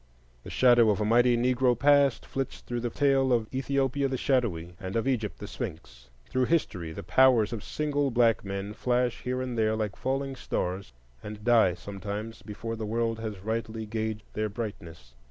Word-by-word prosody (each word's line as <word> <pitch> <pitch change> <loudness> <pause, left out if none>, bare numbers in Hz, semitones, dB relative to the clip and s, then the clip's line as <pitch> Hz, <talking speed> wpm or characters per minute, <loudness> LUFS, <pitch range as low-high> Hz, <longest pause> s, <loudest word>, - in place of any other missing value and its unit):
The - - -10
shadow 120 -3 +5
of 105 - +2
a 105 - 0
mighty 120 +2 +4
Negro 125 0 +2
past 140 -1 +4
flits 135 -1 -4
through 120 0 -4
the 120 0 -2
tale 135 0 +2
of 115 -2 +2
Ethiopia 135 +1 0
the 130 -1 -2
Shadowy 100 -12 0
and 95 +2 -6
of 115 +3 0
Egypt 115 -6 -1
the - - -8
Sphinx. - - -7 0.2
Through 130 0 0
history, 95 - -1
the - - -7
powers 125 -4 +4
of 110 - -5
single 145 -2 -1
black 120 -2 +3
men 100 +1 -4
flash 125 +1 0
here 130 +1 -2
and 125 -1 -4
there 110 -1 +2
like 105 -2 -2
falling 135 +1 -2
stars, 95 - -3 0.3
and 105 0 -8
die 115 -7 +4
sometimes 100 +4 -6
before 115 +2 -6
the 110 -1 -5
world 115 0 -1
has 110 -4 -5
rightly 110 +1 -3
gauged 110 0 -3
their 110 0 -1
brightness. 85 - -7
115 Hz, 180 wpm, -28 LUFS, 105-130 Hz, 0.3 s, shadow